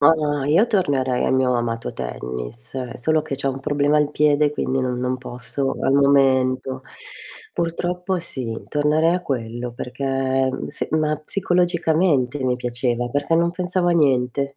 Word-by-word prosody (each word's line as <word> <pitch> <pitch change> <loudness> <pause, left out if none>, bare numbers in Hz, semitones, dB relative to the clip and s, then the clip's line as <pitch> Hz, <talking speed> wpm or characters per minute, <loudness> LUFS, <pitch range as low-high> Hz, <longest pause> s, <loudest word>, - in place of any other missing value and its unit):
Ah, 145 -2 +3
io 165 +10 +4
tornerei 140 - +1
al - - +1
mio 130 -1 +2
amato 115 -1 -2
tennis, 60 - -6
solo 155 +5 +1
che 140 - -4
c'ho 135 0 -2
un 135 0 -3
problema 145 +1 +1
al 150 -1 +2
piede, 150 0 +3
quindi 135 -2 -1
non 125 -1 -1
non 125 +1 -1
posso 125 +2 -4
al 135 - +2
momento. 130 -2 +3 0.7
Purtroppo 180 +2 -1
sì, 130 -9 -5
tornerei 155 +3 +2
a 180 - -2
quello 120 -3 -4
perché, 130 +1 -1 0.2
s 145 - -4
ma 155 -1 +1
psicologicamente 165 -5 +1
mi 125 -1 +1
piaceva, 120 0 -1
perché 145 +6 0
non 170 +1 +2
pensavo 180 0 0
a - - +4
niente. 140 -3 +1
140 Hz, 150 wpm, -22 LUFS, 125-155 Hz, 0.7 s, io